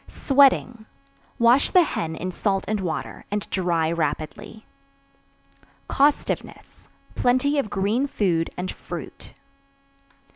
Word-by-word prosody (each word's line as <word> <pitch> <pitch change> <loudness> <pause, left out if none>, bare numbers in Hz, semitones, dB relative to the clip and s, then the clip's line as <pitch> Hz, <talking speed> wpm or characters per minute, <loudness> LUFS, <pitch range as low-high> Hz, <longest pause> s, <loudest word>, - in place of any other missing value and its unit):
Sweating. 260 -5 +2 0.5
Wash 240 +4 +4
the 365 - +5
hen 160 - -3
in 185 +3 -4
salt 195 +1 -1
and 215 0 -1
water, 180 -4 -4
and 205 0 -3
dry 170 -4 0
rapidly. 160 +6 -4 1.2
Costiveness. 285 +1 -1 0.3
Plenty 255 +4 +2
of 220 - -2
green 210 +8 0
food 175 -11 0
and 180 +1 -3
fruit. - - -9
210 Hz, 105 wpm, -23 LUFS, 175-255 Hz, 1.2 s, the